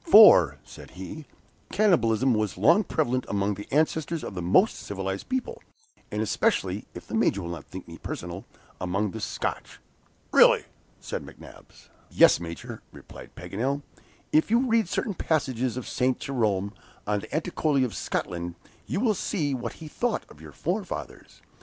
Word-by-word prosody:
"For," 90 Hz, -, +9 dB
said -, -, -12 dB
he, 145 Hz, -, -8 dB, 0.4 s
"cannibalism 130 Hz, -, +3 dB
was 110 Hz, -3 st, -1 dB
long 170 Hz, +8 st, +5 dB
prevalent 130 Hz, -8 st, 0 dB
among 100 Hz, 0 st, 0 dB
the 105 Hz, +1 st, -9 dB
ancestors 160 Hz, +2 st, +1 dB
of -, -, -5 dB
the 90 Hz, -, -4 dB
most 95 Hz, -, +4 dB
civilized 95 Hz, -1 st, -4 dB
people, 260 Hz, -, -2 dB, 0.5 s
and 105 Hz, +1 st, -1 dB
especially 110 Hz, -, 0 dB
(if -, -, -8 dB
the -, -, -10 dB
Major 100 Hz, -, +2 dB
will 85 Hz, -, -4 dB
not 85 Hz, -, -7 dB
think 95 Hz, 0 st, -9 dB
me 85 Hz, 0 st, -10 dB
personal) 85 Hz, +2 st, -6 dB, 0.4 s
among 95 Hz, +3 st, 0 dB
the 110 Hz, -, -6 dB
Scotch." 105 Hz, -, -4 dB, 0.5 s
"Really," -, -, +6 dB, 0.4 s
said -, -, -5 dB
McNabbs. -, -, -15 dB, 0.2 s
"Yes, -, -, +6 dB
Major," 85 Hz, -1 st, -7 dB
replied -, -, -13 dB
Paganel. 120 Hz, +11 st, -2 dB, 0.5 s
"If 155 Hz, +5 st, +3 dB
you 235 Hz, +4 st, +3 dB
read 225 Hz, -5 st, +2 dB
certain 205 Hz, -, -1 dB
passages 130 Hz, -8 st, -1 dB
of 125 Hz, -, -5 dB
Saint 130 Hz, 0 st, +1 dB
Jerome, 105 Hz, -6 st, 0 dB, 0.3 s
on 105 Hz, 0 st, 0 dB
the -, -, -9 dB
Atticoli 155 Hz, -4 st, +1 dB
of 120 Hz, -, -5 dB
Scotland, 85 Hz, 0 st, -3 dB, 0.3 s
you 190 Hz, -, -1 dB
will 225 Hz, -1 st, +3 dB
see 165 Hz, -7 st, -1 dB
what 120 Hz, -3 st, -4 dB
he 160 Hz, -, -10 dB
thought 240 Hz, +10 st, -1 dB
of -, -, -15 dB
your -, -, -10 dB
forefathers. -, -, -5 dB
125 Hz, 160 wpm, -27 LUFS, 100-160 Hz, 0.5 s, For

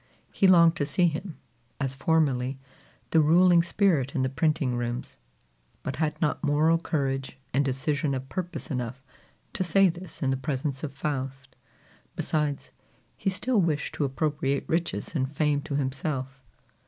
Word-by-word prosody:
He 195 Hz, -, +3 dB
longed 170 Hz, -2 st, +6 dB
to 145 Hz, -, 0 dB
see 180 Hz, -, +2 dB
him, 170 Hz, +2 st, -2 dB, 0.4 s
as 135 Hz, -1 st, -2 dB
formerly, 135 Hz, -4 st, +1 dB, 0.5 s
the 165 Hz, -, +5 dB
ruling 170 Hz, +3 st, +6 dB
spirit 170 Hz, -7 st, +1 dB
in 130 Hz, -, +1 dB
the 130 Hz, -, +1 dB
printing 140 Hz, -2 st, +1 dB
rooms, 120 Hz, 0 st, -4 dB, 0.6 s
but 130 Hz, -1 st, -4 dB
had 155 Hz, -1 st, -1 dB
not 150 Hz, -, 0 dB
moral 155 Hz, +3 st, +3 dB
courage 135 Hz, -6 st, -2 dB, 0.2 s
and 140 Hz, +3 st, +3 dB
decision 140 Hz, +1 st, -1 dB
of 130 Hz, 0 st, -5 dB
purpose 175 Hz, +3 st, -5 dB
enough 125 Hz, 0 st, -4 dB, 0.5 s
to 225 Hz, -6 st, 0 dB
say 190 Hz, +2 st, +4 dB
this 175 Hz, -2 st, -7 dB
in 135 Hz, -, +2 dB
the 135 Hz, -, 0 dB
presence 135 Hz, +1 st, -3 dB
of 150 Hz, -, -3 dB
Faust. 135 Hz, -2 st, -4 dB, 0.6 s
Besides, 150 Hz, -4 st, -2 dB, 0.4 s
he -, -, -1 dB
still 210 Hz, +4 st, +1 dB
wished 155 Hz, -2 st, -1 dB
to 155 Hz, -, -1 dB
appropriate 140 Hz, 0 st, -1 dB
riches 165 Hz, +1 st, -1 dB
and 135 Hz, -4 st, -1 dB
fame 150 Hz, -1 st, +1 dB
to 140 Hz, -, -4 dB
himself. 135 Hz, -1 st, -3 dB
145 Hz, 155 wpm, -27 LUFS, 135-165 Hz, 0.6 s, longed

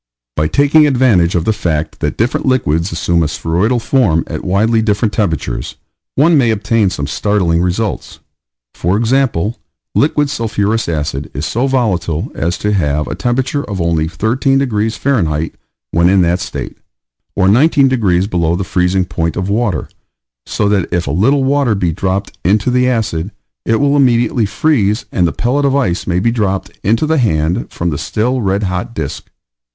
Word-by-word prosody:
By 75 Hz, 0 st, +1 dB
taking 145 Hz, -, +4 dB
advantage 120 Hz, -11 st, +3 dB
of 85 Hz, -1 st, 0 dB
the 110 Hz, -, +2 dB
fact 80 Hz, -7 st, -2 dB
that -, -, -2 dB
different 120 Hz, +4 st, 0 dB
liquids 85 Hz, -, +1 dB
assume 85 Hz, +1 st, 0 dB
a 80 Hz, -, +1 dB
spheroidal 90 Hz, -, 0 dB
form 115 Hz, -, +1 dB
at -, -, -6 dB
widely 110 Hz, +5 st, +2 dB
different 105 Hz, 0 st, 0 dB
temperatures, 80 Hz, -, -2 dB, 0.4 s
one 155 Hz, +2 st, +4 dB
may 120 Hz, -3 st, +3 dB
obtain 110 Hz, -1 st, +1 dB
some 70 Hz, -6 st, -4 dB
startling 85 Hz, +1 st, 0 dB
results. 95 Hz, +4 st, -2 dB, 0.5 s
For 90 Hz, +4 st, 0 dB
example, 120 Hz, -3 st, 0 dB, 0.3 s
liquid 145 Hz, -1 st, +1 dB
sulphurous 110 Hz, -4 st, -1 dB
acid 75 Hz, -3 st, -3 dB
is 70 Hz, +3 st, -3 dB
so 120 Hz, +10 st, 0 dB
volatile 95 Hz, -, -1 dB
as 85 Hz, +3 st, -2 dB
to 105 Hz, 0 st, -1 dB
have 75 Hz, -5 st, 0 dB
a -, -, -4 dB
temperature 125 Hz, -, -1 dB
of 100 Hz, -2 st, -5 dB
only 85 Hz, -2 st, 0 dB
13 115 Hz, -, 0 dB
degrees 110 Hz, -5 st, -1 dB
F. 80 Hz, -, +1 dB, 0.4 s
when 85 Hz, +1 st, +3 dB
in 95 Hz, -1 st, +4 dB
that 85 Hz, +2 st, +1 dB
state, 95 Hz, -, -6 dB, 0.6 s
or 95 Hz, -1 st, +2 dB
19 135 Hz, +6 st, +4 dB
degrees 100 Hz, -8 st, +1 dB
below 85 Hz, -5 st, 0 dB
the 95 Hz, -, -2 dB
freezing 90 Hz, 0 st, 0 dB
point 85 Hz, -2 st, -2 dB
of 95 Hz, +1 st, -2 dB
water, 105 Hz, -5 st, -1 dB, 0.6 s
so 105 Hz, -, 0 dB
that 100 Hz, -3 st, 0 dB
if 90 Hz, -1 st, 0 dB
a 70 Hz, -, -2 dB
little 130 Hz, -, +2 dB
water 135 Hz, -4 st, +2 dB
be 90 Hz, -4 st, 0 dB
dropped 95 Hz, +4 st, -2 dB
into 105 Hz, +6 st, +2 dB
the 125 Hz, 0 st, +2 dB
acid, 100 Hz, -8 st, -1 dB, 0.4 s
it 115 Hz, -, +2 dB
will 140 Hz, +4 st, +2 dB
immediately 120 Hz, -4 st, +2 dB
freeze 110 Hz, -2 st, +1 dB
and 90 Hz, -2 st, +2 dB
the -, -, -1 dB
pellet 135 Hz, +4 st, 0 dB
of 140 Hz, -1 st, +2 dB
ice 95 Hz, -11 st, 0 dB
may 90 Hz, -1 st, 0 dB
be 115 Hz, +6 st, +1 dB
dropped 100 Hz, -5 st, -1 dB
into 115 Hz, +9 st, +2 dB
the 160 Hz, 0 st, +1 dB
hand 80 Hz, -7 st, 0 dB
from 85 Hz, 0 st, -2 dB
the 70 Hz, -, -3 dB
still 125 Hz, +4 st, -1 dB
red 100 Hz, 0 st, 0 dB
hot 90 Hz, +4 st, -3 dB
disk. 75 Hz, -4 st, -5 dB
105 Hz, 175 wpm, -15 LUFS, 85-120 Hz, 0.6 s, taking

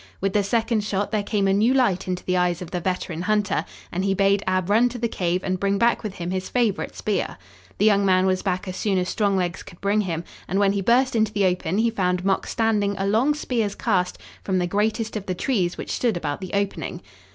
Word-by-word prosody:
With 195 Hz, 0 st, -1 dB
the 210 Hz, -, +3 dB
second 225 Hz, +1 st, 0 dB
shot 205 Hz, -1 st, -2 dB
there 215 Hz, -2 st, +1 dB
came 200 Hz, -1 st, 0 dB
a 195 Hz, -, +3 dB
new 225 Hz, +6 st, +3 dB
light 195 Hz, -9 st, +2 dB
into 180 Hz, 0 st, -3 dB
the 185 Hz, -, +1 dB
eyes 180 Hz, -1 st, +1 dB
of 175 Hz, -2 st, -8 dB
the 180 Hz, -, -1 dB
veteran 175 Hz, -1 st, -3 dB
hunter 205 Hz, -4 st, +1 dB, 0.3 s
and 185 Hz, +2 st, -2 dB
he 195 Hz, 0 st, +1 dB
bade 195 Hz, +1 st, +3 dB
Ab 185 Hz, -1 st, +1 dB
run 225 Hz, +5 st, +4 dB
to 245 Hz, -, -7 dB
the 235 Hz, 0 st, 0 dB
cave 180 Hz, -4 st, -1 dB
and 185 Hz, -1 st, -1 dB
bring 200 Hz, +1 st, +1 dB
back 235 Hz, +3 st, +2 dB
with 210 Hz, -3 st, -5 dB
him 175 Hz, 0 st, -4 dB
his 185 Hz, 0 st, -3 dB
favorite 235 Hz, -5 st, 0 dB
spear. 205 Hz, -3 st, -2 dB, 0.4 s
The 205 Hz, -, +2 dB
young 200 Hz, -2 st, +4 dB
man 185 Hz, -1 st, +3 dB
was 185 Hz, -1 st, +1 dB
back 185 Hz, -1 st, -2 dB
as 185 Hz, -, -4 dB
soon 200 Hz, -1 st, 0 dB
as 180 Hz, 0 st, 0 dB
strong 205 Hz, -3 st, +1 dB
legs 180 Hz, -1 st, -1 dB
could 170 Hz, -, -13 dB
bring 205 Hz, +2 st, +2 dB
him, 170 Hz, -4 st, -3 dB, 0.2 s
and 190 Hz, -, -1 dB
when 200 Hz, -1 st, +4 dB
he 200 Hz, -, -1 dB
burst 245 Hz, +5 st, +3 dB
into 220 Hz, -2 st, +2 dB
the 205 Hz, -2 st, +1 dB
open 180 Hz, 0 st, 0 dB
he 230 Hz, +1 st, +2 dB
found 180 Hz, -3 st, 0 dB
Mok 195 Hz, -1 st, +1 dB
standing 210 Hz, -3 st, +1 dB
a 195 Hz, -, -1 dB
long 230 Hz, +9 st, +2 dB
spear's 230 Hz, -8 st, -1 dB
cast 185 Hz, -5 st, 0 dB, 0.3 s
from 190 Hz, -1 st, 0 dB
the 180 Hz, -, +1 dB
greatest 215 Hz, +4 st, -1 dB
of 205 Hz, -2 st, -4 dB
the 185 Hz, -, -1 dB
trees 180 Hz, -5 st, 0 dB
which -, -, -5 dB
stood 230 Hz, -7 st, 0 dB
about 145 Hz, -2 st, -3 dB
the 185 Hz, -, -7 dB
opening. 200 Hz, -, -2 dB
195 Hz, 245 wpm, -23 LUFS, 185-215 Hz, 0.4 s, run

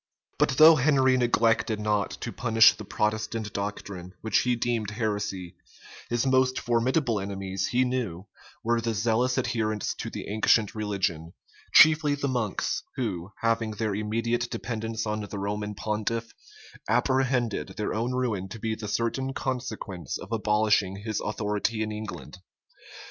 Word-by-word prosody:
But 130 Hz, -, +2 dB
though 155 Hz, +1 st, +9 dB
Henry 135 Hz, -2 st, +4 dB
neglected 115 Hz, -2 st, +2 dB
not 105 Hz, -1 st, 0 dB
to -, -, -4 dB
punish 115 Hz, -2 st, +5 dB
the -, -, -9 dB
Protestant 105 Hz, +1 st, -2 dB
doctrine, 100 Hz, -3 st, -5 dB
which 110 Hz, -, +2 dB
he 125 Hz, -1 st, +1 dB
deemed 115 Hz, -3 st, -1 dB
heresy, 105 Hz, -5 st, -3 dB, 0.6 s
his 120 Hz, +2 st, 0 dB
most 130 Hz, -1 st, +3 dB
formidable 120 Hz, 0 st, +1 dB
enemies, 95 Hz, -1 st, -3 dB
he 125 Hz, +1 st, +2 dB
knew, 115 Hz, -8 st, -3 dB, 0.4 s
were 115 Hz, 0 st, +1 dB
the 115 Hz, -1 st, -1 dB
zealous 120 Hz, +3 st, +1 dB
adherents 110 Hz, -4 st, -1 dB
to -, -, -4 dB
the -, -, -7 dB
ancient 110 Hz, 0 st, +2 dB
religion, 95 Hz, -6 st, -2 dB, 0.4 s
chiefly 155 Hz, 0 st, +7 dB
the 140 Hz, 0 st, -2 dB
monks, 120 Hz, -6 st, -1 dB
who, 100 Hz, -7 st, -3 dB
having 115 Hz, -1 st, +1 dB
their 105 Hz, 0 st, -2 dB
immediate 115 Hz, +4 st, -1 dB
dependence 115 Hz, -1 st, -4 dB
on 105 Hz, 0 st, -2 dB
the 100 Hz, 0 st, -6 dB
Roman 105 Hz, +1 st, -3 dB
pontiff, 110 Hz, +3 st, -2 dB, 0.6 s
apprehended 130 Hz, -4 st, +1 dB
their 105 Hz, -, -2 dB
own 115 Hz, +3 st, -1 dB
ruin 110 Hz, -7 st, -1 dB
to 115 Hz, -, -8 dB
be 110 Hz, 0 st, -2 dB
the 110 Hz, -1 st, -6 dB
certain 130 Hz, +5 st, -1 dB
consequence 115 Hz, -8 st, -4 dB
of -, -, -11 dB
abolishing 105 Hz, -3 st, +2 dB
his 110 Hz, -1 st, -2 dB
authority 105 Hz, +1 st, -1 dB
in 110 Hz, -, -4 dB
England. 95 Hz, -7 st, -7 dB
110 Hz, 145 wpm, -27 LUFS, 105-120 Hz, 0.6 s, though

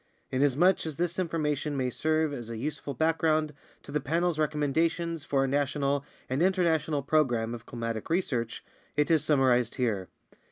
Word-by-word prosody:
Inasmuch 145 Hz, +8 st, +3 dB
as 155 Hz, -, -4 dB
this 175 Hz, +2 st, -1 dB
information 150 Hz, -4 st, -1 dB
may 130 Hz, -1 st, 0 dB
serve 155 Hz, +2 st, +1 dB
as 120 Hz, -4 st, -6 dB
a 115 Hz, -, -5 dB
useful 145 Hz, +2 st, -4 dB
background 155 Hz, 0 st, +1 dB, 0.3 s
to -, -, -10 dB
the 150 Hz, -, +1 dB
Panel's 165 Hz, +3 st, 0 dB
recommendations 160 Hz, +2 st, 0 dB
for 135 Hz, -1 st, +1 dB
a -, -, +1 dB
national 140 Hz, 0 st, 0 dB, 0.2 s
and 130 Hz, +4 st, -1 dB
inter 185 Hz, 0 st, +3 dB
national 155 Hz, -3 st, +1 dB
program 120 Hz, -6 st, +1 dB
of 120 Hz, -1 st, -9 dB
climatic 115 Hz, -2 st, -4 dB
research, 130 Hz, -10 st, -1 dB, 0.3 s
it 150 Hz, +2 st, +2 dB
is 160 Hz, -3 st, +4 dB
summarized 130 Hz, -6 st, +3 dB
here. 105 Hz, -7 st, -1 dB
150 Hz, 160 wpm, -29 LUFS, 130-160 Hz, 0.3 s, is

